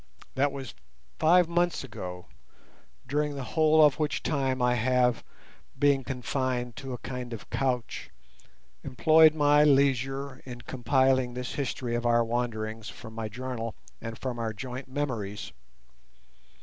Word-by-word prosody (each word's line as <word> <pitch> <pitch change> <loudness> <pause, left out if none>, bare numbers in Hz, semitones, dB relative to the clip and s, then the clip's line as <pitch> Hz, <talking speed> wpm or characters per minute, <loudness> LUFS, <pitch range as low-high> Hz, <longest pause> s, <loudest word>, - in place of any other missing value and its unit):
That 140 +2 +2
was 135 -6 -7 0.5
five 175 +2 +5
months 175 -1 +1
ago, 90 -8 -7 0.8
during 145 +2 0
the 135 - -4
whole 155 +2 +5
of 150 +1 +2
which 150 -1 -1
time 135 -4 0
I 125 0 +3
have, 125 0 +2 0.5
being 140 -2 +3
confined 125 -2 -2
to 135 -1 -6
a - - -4
kind 125 0 -6
of 115 - -9
couch, 125 -3 -2 0.7
employed 155 +4 +5
my 145 -1 +5
leisure 135 -1 +2
in 125 -2 -9
compiling 130 0 +1
this 125 0 -4
history 130 -3 -3
of 120 0 0
our 120 0 +4
wanderings 115 -2 -3
from 110 -1 -10
my 110 -1 -4
journal 115 -1 -5 0.3
and 115 -1 -6
from 125 -3 -4
our 115 -1 -2
joint 130 +3 -7
memories. 125 -7 -4
130 Hz, 135 wpm, -28 LUFS, 120-140 Hz, 0.8 s, five